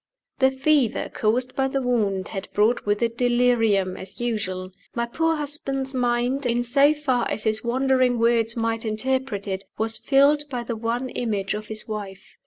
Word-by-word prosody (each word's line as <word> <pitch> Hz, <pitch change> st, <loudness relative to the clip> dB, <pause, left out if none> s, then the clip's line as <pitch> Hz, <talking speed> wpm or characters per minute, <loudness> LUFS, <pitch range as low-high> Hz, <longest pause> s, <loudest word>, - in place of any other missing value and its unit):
The 265 Hz, 0 st, +5 dB
fever 265 Hz, -2 st, +1 dB
caused 245 Hz, +4 st, 0 dB
by 270 Hz, 0 st, +1 dB
the 270 Hz, 0 st, -1 dB
wound 205 Hz, -6 st, 0 dB
had 195 Hz, -2 st, -5 dB
brought 215 Hz, +2 st, +2 dB
with 205 Hz, +2 st, +1 dB
it 230 Hz, 0 st, -2 dB
delirium, 240 Hz, -6 st, +2 dB
as 190 Hz, +1 st, -9 dB
usual. 190 Hz, -6 st, -3 dB, 0.2 s
My 235 Hz, 0 st, 0 dB
poor 325 Hz, +7 st, 0 dB
husband's 275 Hz, -2 st, -3 dB
mind, 245 Hz, +2 st, 0 dB
in 240 Hz, 0 st, +1 dB
so 275 Hz, +4 st, +4 dB
far 270 Hz, -6 st, 0 dB
as -, -, -2 dB
his 220 Hz, -1 st, +1 dB
wandering 255 Hz, 0 st, +2 dB
words 230 Hz, 0 st, +2 dB
might 225 Hz, 0 st, -1 dB
interpret 230 Hz, -1 st, -2 dB
it, 190 Hz, 0 st, -3 dB
was 220 Hz, +1 st, -2 dB
filled 285 Hz, +1 st, +4 dB
by 245 Hz, -3 st, -3 dB
the 235 Hz, 0 st, -4 dB
one 235 Hz, +3 st, -2 dB
image 205 Hz, -6 st, -2 dB
of 210 Hz, 0 st, -5 dB
his 215 Hz, 0 st, -3 dB
wife. 205 Hz, -3 st, -7 dB
240 Hz, 175 wpm, -24 LUFS, 215-265 Hz, 0.2 s, The